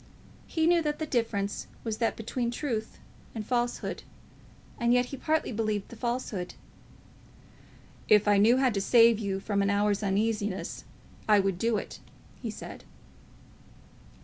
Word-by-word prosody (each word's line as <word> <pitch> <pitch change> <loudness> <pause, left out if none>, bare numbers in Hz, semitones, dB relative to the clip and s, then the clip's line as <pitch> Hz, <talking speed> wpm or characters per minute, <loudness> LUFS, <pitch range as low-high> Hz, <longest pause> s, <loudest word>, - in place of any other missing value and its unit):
He 320 -1 0
knew 340 0 +4
that 300 -1 -1
the 315 - -3
difference 225 -7 -1 0.2
was 220 -2 -3
that 230 - +1
between 235 +2 -2
truth 235 -3 -3 0.4
and 215 -2 -4
falsehood; 240 +1 -1 0.8
and 235 0 +3
yet 250 0 +3
he 275 - -7
partly 310 +2 0
believed 215 -3 -2
the - - -10
falsehood! 235 -6 -3 1.5
"If 210 0 +5
I 205 -1 +5
knew 230 +5 +5
how 260 -1 +3
to 200 -2 -1
save 230 +1 +5
you 195 -3 -2
from 200 0 -1
an 200 - +1
hour's 205 0 +2
uneasiness, 205 0 -1 0.4
I 210 -1 +7
would 195 -2 0
do 230 0 +1
it," - - -6 0.4
he - - -3
said. - - -8
225 Hz, 150 wpm, -28 LUFS, 205-245 Hz, 1.5 s, I